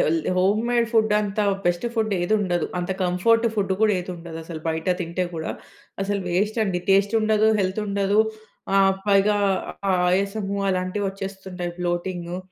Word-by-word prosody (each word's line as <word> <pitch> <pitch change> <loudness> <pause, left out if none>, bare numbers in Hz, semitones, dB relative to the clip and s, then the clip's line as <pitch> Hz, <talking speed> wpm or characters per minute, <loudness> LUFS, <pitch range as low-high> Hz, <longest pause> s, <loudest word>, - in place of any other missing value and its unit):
హెల్ 165 +1 +2 0.2
home 200 +4 +3
made 235 -1 +2
food 220 -2 +3
అంత 205 0 -2 0.2
best 175 +6 +1
food 220 -2 0
ఏదుండదు. 180 -3 +1
అంత 180 +1 -3
comfort 225 +6 +3
food 195 -2 0
కూడా 215 -1 +4
ఏదుండదు, 170 -2 -7
అసలు 160 -1 -7
బయట 160 +1 -2
తింటే 175 +1 -2
కూడా. 160 0 -3 0.5
అసలు 200 0 -1
వేస్ట్ 210 +6 0
అండి, 180 -3 -1
టేస్ట్ 200 +3 +3
ఉండదు, 215 0 +3
హెల్త్ 190 +3 -1
ఉండదు. 200 +1 +2 0.6
ఆహ్, 195 0 +5
పైగా 200 +1 +4 0.5
ఆహ్, 185 - +2
ఆయాసము 200 +1 -1
అలాంటివి 185 +2 -1
వచ్చేస్తుంటాయి, 190 -2 -6
బ్లొటింగు 175 0 -3
195 Hz, 150 wpm, -23 LUFS, 180-210 Hz, 0.6 s, ఆహ్